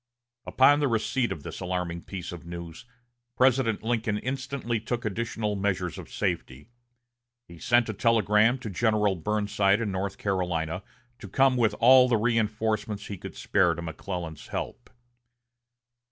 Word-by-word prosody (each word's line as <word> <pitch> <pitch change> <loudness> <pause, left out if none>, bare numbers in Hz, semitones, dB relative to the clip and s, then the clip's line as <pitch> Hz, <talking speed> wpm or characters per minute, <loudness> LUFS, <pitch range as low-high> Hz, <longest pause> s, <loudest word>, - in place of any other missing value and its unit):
Upon 145 +3 +5
the 145 - +2
receipt 120 +1 0
of 75 - -5
this - - -7
alarming 90 -2 -3
piece 95 -3 -6
of 90 -2 -8
news, 85 +2 -8 0.5
President 130 -4 +2
Lincoln 110 -2 0
instantly 130 -1 -3
took 120 +2 -4
additional 110 0 -2
measures 95 -3 -2
of - - -11
safety. 65 - -3 0.8
He 85 -1 -13
sent 120 +4 +3
a 110 - -3
telegram 110 +2 +3
to 115 - -5
General 105 -1 +2
Burnside 105 +2 +1
in 110 -4 -2
North 95 +1 -3
Carolina 90 -3 -1 0.4
to 105 - -9
come 135 +5 +3
with 115 -4 +2
all 130 +2 +7
the 120 - +3
reinforcements 110 -2 -1
he 100 - -6
could - - -8
spare 90 -4 +2
to 85 - -6
McClellan's 80 -1 -6
help. - - -6
105 Hz, 145 wpm, -27 LUFS, 90-115 Hz, 0.8 s, all